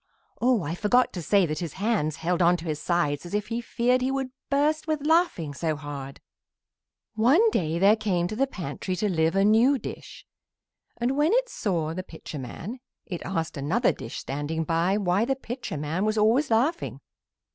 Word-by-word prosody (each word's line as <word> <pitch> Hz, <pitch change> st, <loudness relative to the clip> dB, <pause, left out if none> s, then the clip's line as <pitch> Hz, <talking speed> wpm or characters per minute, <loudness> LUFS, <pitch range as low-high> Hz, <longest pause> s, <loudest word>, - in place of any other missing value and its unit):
Oh, 245 Hz, -5 st, +3 dB
I 160 Hz, +1 st, -3 dB
forgot 220 Hz, +7 st, +2 dB
to 180 Hz, -, -4 dB
say 195 Hz, +3 st, +3 dB
that 155 Hz, -2 st, -3 dB
his 170 Hz, -5 st, -4 dB
hands 195 Hz, -7 st, 0 dB
held 170 Hz, +2 st, -1 dB
on 175 Hz, +1 st, +5 dB
to 170 Hz, -, -9 dB
his 155 Hz, -2 st, -3 dB
sides 170 Hz, -5 st, 0 dB
as 175 Hz, +3 st, -5 dB
if 210 Hz, 0 st, -2 dB
he 230 Hz, +1 st, -2 dB
feared 245 Hz, +2 st, +1 dB
he 255 Hz, -, +1 dB
would 270 Hz, -1 st, -2 dB, 0.2 s
burst 300 Hz, +3 st, +1 dB
with 305 Hz, -2 st, -1 dB
laughing 315 Hz, -, +2 dB
so 155 Hz, +1 st, -1 dB
hard. 140 Hz, -2 st, -7 dB, 0.9 s
One 275 Hz, -, +4 dB
day 160 Hz, -, 0 dB
there 200 Hz, +4 st, +5 dB
came 185 Hz, -6 st, 0 dB
to 215 Hz, -, -5 dB
the 270 Hz, +4 st, +1 dB
pantry 185 Hz, -, -4 dB
to 210 Hz, -, 0 dB
live 165 Hz, -2 st, +1 dB
a 195 Hz, 0 st, +4 dB
new 230 Hz, +6 st, +5 dB
dish, -, -, -9 dB, 0.7 s
and 245 Hz, +3 st, 0 dB
when 300 Hz, +7 st, +3 dB
it -, -, +2 dB
saw 165 Hz, -6 st, -1 dB
the 185 Hz, -, -3 dB
Pitcher 160 Hz, -4 st, -9 dB
man 195 Hz, -, -7 dB, 0.3 s
it 175 Hz, -3 st, -5 dB
asked 165 Hz, -5 st, -3 dB
another 175 Hz, -, +2 dB
dish 115 Hz, -, -7 dB
standing 145 Hz, +4 st, -3 dB
by 170 Hz, +5 st, +1 dB
why 195 Hz, 0 st, +1 dB
the 270 Hz, +3 st, 0 dB
Pitcher 245 Hz, -, -6 dB
man 155 Hz, +6 st, -2 dB
was 215 Hz, +1 st, 0 dB
always 230 Hz, +7 st, +3 dB
laughing. 265 Hz, +10 st, 0 dB
195 Hz, 190 wpm, -26 LUFS, 165-245 Hz, 0.9 s, on